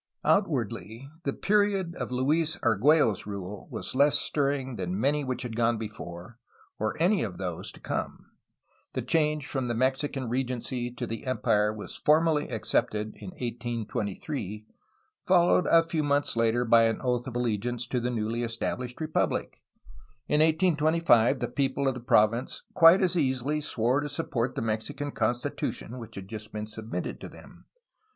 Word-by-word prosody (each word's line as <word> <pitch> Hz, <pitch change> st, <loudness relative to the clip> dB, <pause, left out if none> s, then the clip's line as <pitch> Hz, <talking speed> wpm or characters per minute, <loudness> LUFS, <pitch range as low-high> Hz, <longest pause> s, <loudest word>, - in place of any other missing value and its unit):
Outwardly 120 Hz, -, 0 dB
the 140 Hz, -, +1 dB
period 200 Hz, -1 st, +1 dB
of -, -, -5 dB
Luis 150 Hz, +6 st, +1 dB
Argtiello's 120 Hz, -, +3 dB
rule 100 Hz, -1 st, -6 dB
was -, -, -5 dB
less 140 Hz, +3 st, +4 dB
stir 140 Hz, -2 st, +1 dB
ring 130 Hz, -3 st, -3 dB
than 95 Hz, -1 st, -3 dB
many 145 Hz, +4 st, +2 dB
which 130 Hz, -1 st, -3 dB
had 120 Hz, -2 st, -5 dB
gone 115 Hz, 0 st, +2 dB
before 105 Hz, 0 st, -8 dB, 0.4 s
or 110 Hz, +4 st, -2 dB
any 185 Hz, +4 st, +3 dB
of 100 Hz, -6 st, -4 dB
those 90 Hz, -3 st, -5 dB
to -, -, -14 dB
come. -, -, -5 dB, 0.6 s
The -, -, -2 dB
change 150 Hz, -2 st, +1 dB
from 135 Hz, -3 st, -2 dB
the 120 Hz, -1 st, -1 dB
Mexican 130 Hz, +1 st, 0 dB
regency 125 Hz, 0 st, -2 dB
to 125 Hz, -, -5 dB
the 115 Hz, +3 st, -6 dB
empire 105 Hz, -4 st, +2 dB
was 105 Hz, -1 st, -7 dB
formally 155 Hz, 0 st, +3 dB
accepted 110 Hz, -2 st, -1 dB
in -, -, -10 dB
1823, 115 Hz, -, -4 dB, 0.6 s
followed 180 Hz, -1 st, +4 dB
a 165 Hz, 0 st, +6 dB
few 165 Hz, -1 st, -1 dB
months 145 Hz, -2 st, +1 dB
later 115 Hz, +1 st, +2 dB
by 115 Hz, 0 st, +6 dB
an 115 Hz, 0 st, 0 dB
oath 125 Hz, 0 st, 0 dB
of 125 Hz, -, -6 dB
allegiance 120 Hz, 0 st, -1 dB
to 125 Hz, +1 st, -1 dB
the 120 Hz, +1 st, -1 dB
newly 115 Hz, -1 st, -2 dB
estabUshed 120 Hz, +1 st, -3 dB
republic. 155 Hz, -1 st, -1 dB, 0.7 s
In 150 Hz, -, +2 dB
1825 155 Hz, -6 st, +3 dB
the -, -, 0 dB
people 140 Hz, -1 st, 0 dB
of 135 Hz, -, +2 dB
the 125 Hz, -, -6 dB
province 115 Hz, +1 st, +2 dB
quite 175 Hz, +2 st, +7 dB
as 185 Hz, -1 st, +2 dB
easily 140 Hz, -1 st, 0 dB
swore 125 Hz, -1 st, +1 dB
to 145 Hz, 0 st, -3 dB
support 135 Hz, -4 st, -2 dB
the -, -, -2 dB
Mexican 115 Hz, +7 st, -3 dB
Constitution 120 Hz, +1 st, -2 dB
which 115 Hz, -, -10 dB
had 95 Hz, -1 st, -7 dB
just 110 Hz, 0 st, -8 dB
been 105 Hz, 0 st, -4 dB
sub 110 Hz, +1 st, -9 dB
mitted -, -, -4 dB
to -, -, -7 dB
them. -, -, -15 dB
125 Hz, 160 wpm, -28 LUFS, 115-150 Hz, 0.7 s, quite